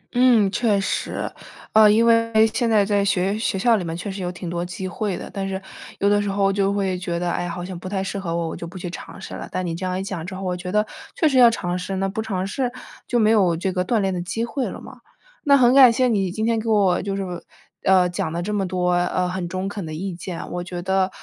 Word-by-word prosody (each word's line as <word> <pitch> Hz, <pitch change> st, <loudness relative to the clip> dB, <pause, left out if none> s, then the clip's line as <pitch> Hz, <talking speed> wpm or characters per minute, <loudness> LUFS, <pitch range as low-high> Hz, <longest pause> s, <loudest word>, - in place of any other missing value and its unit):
嗯， 240 Hz, -5 st, +5 dB
确 215 Hz, -2 st, +2 dB
实， 195 Hz, -, -2 dB, 0.4 s
呃， 215 Hz, -1 st, +7 dB
因 225 Hz, +2 st, +4 dB
为 230 Hz, 0 st, +4 dB, 0.2 s
现 235 Hz, 0 st, +1 dB
在 210 Hz, -3 st, +4 dB
在 205 Hz, -1 st, +1 dB
学 195 Hz, 0 st, +1 dB
学 220 Hz, -, -1 dB
校 230 Hz, +3 st, +3 dB
里 190 Hz, -, -3 dB
面 165 Hz, 0 st, -4 dB
确 195 Hz, +2 st, -5 dB
实 190 Hz, 0 st, -6 dB
有 180 Hz, -, -2 dB
挺 180 Hz, 0 st, -8 dB
多 170 Hz, 0 st, -2 dB
机 180 Hz, +1 st, -5 dB
会 195 Hz, +1 st, -3 dB
的， -, -, -7 dB
但 195 Hz, -1 st, -3 dB
是 190 Hz, 0 st, -3 dB, 0.4 s
有 200 Hz, -, +1 dB
的 205 Hz, 0 st, +3 dB
时 205 Hz, -, -2 dB
候 195 Hz, 0 st, +1 dB
就 195 Hz, 0 st, +1 dB
会 195 Hz, -2 st, 0 dB
觉 175 Hz, -2 st, -3 dB
得， 175 Hz, 0 st, -1 dB
唉， 175 Hz, 0 st, -2 dB
好 175 Hz, +1 st, -5 dB
像 185 Hz, -1 st, -6 dB
不 185 Hz, -, -7 dB
太 190 Hz, -1 st, -1 dB
适 195 Hz, +1 st, -4 dB
合 170 Hz, -3 st, -3 dB
我， 170 Hz, -1 st, -1 dB
我 -, -, -5 dB
就 170 Hz, -, -7 dB
不 180 Hz, -, -10 dB
去 180 Hz, 0 st, -5 dB
尝 -, -, -9 dB
试 -, -, -8 dB
了。 -, -, -7 dB
但 185 Hz, -, -2 dB
你 170 Hz, -, -2 dB
这 170 Hz, -, -6 dB
样 185 Hz, 0 st, -1 dB
一 -, -, -3 dB
讲 190 Hz, -4 st, -5 dB
之 185 Hz, +2 st, -6 dB
后， 195 Hz, -, -6 dB
我 180 Hz, -1 st, -1 dB
觉 180 Hz, 0 st, -6 dB
得 210 Hz, +1 st, +2 dB, 0.3 s
确 320 Hz, -, +3 dB
实 270 Hz, -3 st, +3 dB
要 240 Hz, -2 st, +9 dB
尝 180 Hz, -6 st, -2 dB
试， 185 Hz, +2 st, -4 dB
那 195 Hz, +1 st, 0 dB
不 205 Hz, +3 st, -3 dB
尝 190 Hz, -4 st, -2 dB
试 245 Hz, +5 st, -2 dB, 0.4 s
就 245 Hz, -, +1 dB
没 215 Hz, -2 st, +4 dB
有 185 Hz, -7 st, +3 dB
这 185 Hz, +3 st, -1 dB
个 180 Hz, -, 0 dB
锻 225 Hz, +5 st, 0 dB
炼 195 Hz, -1 st, 0 dB
的 175 Hz, -, -2 dB
机 225 Hz, +6 st, -2 dB
会 260 Hz, +2 st, -2 dB
了 -, -, -8 dB
嘛。 -, -, -12 dB, 0.5 s
那 280 Hz, -1 st, +6 dB
很 250 Hz, -1 st, +5 dB
感 265 Hz, -3 st, +9 dB
谢 255 Hz, +2 st, +2 dB
你 200 Hz, -6 st, +1 dB
今 220 Hz, +4 st, -2 dB
天 230 Hz, -1 st, +1 dB
给 225 Hz, -, -3 dB
我 195 Hz, -5 st, +3 dB
就 195 Hz, 0 st, -3 dB
是， 195 Hz, -, -2 dB, 0.6 s
呃， 185 Hz, -1 st, +5 dB
讲 175 Hz, -2 st, -3 dB
了 170 Hz, +2 st, -3 dB
这 210 Hz, +3 st, -3 dB
么 195 Hz, -2 st, 0 dB
多， 180 Hz, -1 st, 0 dB
呃， 180 Hz, +1 st, +1 dB
很 180 Hz, -1 st, -3 dB
中 185 Hz, +2 st, -3 dB
肯 200 Hz, 0 st, -5 dB
的 155 Hz, -1 st, -6 dB
意 190 Hz, +3 st, -4 dB
见， 175 Hz, 0 st, -6 dB
我 175 Hz, 0 st, -3 dB
觉 175 Hz, 0 st, -6 dB
得， 190 Hz, 0 st, +1 dB
195 Hz, 300 characters per minute, -22 LUFS, 180-215 Hz, 0.6 s, 要